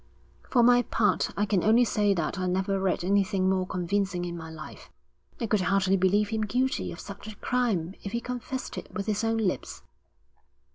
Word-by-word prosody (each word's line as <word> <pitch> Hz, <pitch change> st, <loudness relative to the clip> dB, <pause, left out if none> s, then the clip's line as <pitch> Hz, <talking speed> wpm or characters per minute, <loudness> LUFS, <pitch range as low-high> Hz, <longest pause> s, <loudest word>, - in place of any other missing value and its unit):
'For 245 Hz, -2 st, +4 dB
my 245 Hz, +1 st, +6 dB
part, 210 Hz, -4 st, +1 dB
I 205 Hz, -, +2 dB
can 195 Hz, -4 st, +1 dB
only 225 Hz, +3 st, +5 dB
say 205 Hz, -2 st, +2 dB
that 170 Hz, +2 st, -2 dB
I 185 Hz, -, -1 dB
never 190 Hz, +2 st, 0 dB
read 190 Hz, -2 st, 0 dB
anything 195 Hz, 0 st, +2 dB
more 190 Hz, -1 st, +1 dB
convincing 185 Hz, 0 st, -1 dB
in 175 Hz, -1 st, -4 dB
my 160 Hz, -1 st, -7 dB
life.' 160 Hz, -1 st, -10 dB, 0.5 s
'I 235 Hz, -, -1 dB
could 210 Hz, -2 st, +1 dB
hardly 190 Hz, +1 st, +2 dB
believe 195 Hz, +2 st, +2 dB
him 220 Hz, -1 st, -1 dB
guilty 250 Hz, +5 st, 0 dB
of 170 Hz, -, -9 dB
such 200 Hz, +1 st, -9 dB
a 215 Hz, -, -8 dB
crime 210 Hz, -10 st, 0 dB
if 200 Hz, -, -6 dB
he 235 Hz, -, -1 dB
confessed 250 Hz, +2 st, -5 dB
it -, -, -12 dB
with 200 Hz, -, -4 dB
his 215 Hz, 0 st, -1 dB
own 225 Hz, 0 st, +1 dB
lips.' 205 Hz, -5 st, -2 dB
200 Hz, 195 wpm, -27 LUFS, 185-225 Hz, 0.5 s, my